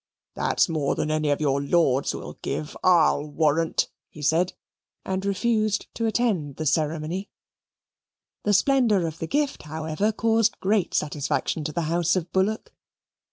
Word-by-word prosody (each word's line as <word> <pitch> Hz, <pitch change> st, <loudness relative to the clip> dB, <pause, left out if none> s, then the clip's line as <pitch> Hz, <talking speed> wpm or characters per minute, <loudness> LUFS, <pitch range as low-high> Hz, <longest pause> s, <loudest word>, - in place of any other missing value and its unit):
"That's -, -, +1 dB
more 155 Hz, -5 st, -1 dB
than 155 Hz, -, -1 dB
any 155 Hz, -1 st, 0 dB
of 145 Hz, -, +1 dB
your 140 Hz, -2 st, +1 dB
Lords 140 Hz, -3 st, +2 dB
will -, -, -7 dB
give, 150 Hz, -, -4 dB
I'LL 170 Hz, -4 st, +4 dB
warrant," 155 Hz, +2 st, +1 dB, 0.2 s
he 150 Hz, -, -11 dB
said 165 Hz, +4 st, +2 dB, 0.5 s
and 190 Hz, 0 st, -2 dB
refused 215 Hz, +1 st, 0 dB
to 230 Hz, -, -1 dB
attend 215 Hz, -10 st, 0 dB
at -, -, -26 dB
the 155 Hz, -, -3 dB
ceremony. 155 Hz, +5 st, -1 dB, 1.1 s
The 205 Hz, -, +1 dB
splendour 225 Hz, -4 st, +3 dB
of 160 Hz, -1 st, -5 dB
the 165 Hz, -, -3 dB
gift, 290 Hz, -, -1 dB
however, 160 Hz, +6 st, -2 dB
caused 225 Hz, 0 st, +1 dB
great 200 Hz, -1 st, +1 dB
satisfaction 150 Hz, +1 st, -1 dB
to 155 Hz, -, -2 dB
the 170 Hz, -, -2 dB
house 170 Hz, +2 st, +1 dB
of 180 Hz, -2 st, -2 dB
Bullock. 200 Hz, +4 st, 0 dB
165 Hz, 155 wpm, -25 LUFS, 155-205 Hz, 1.1 s, I'LL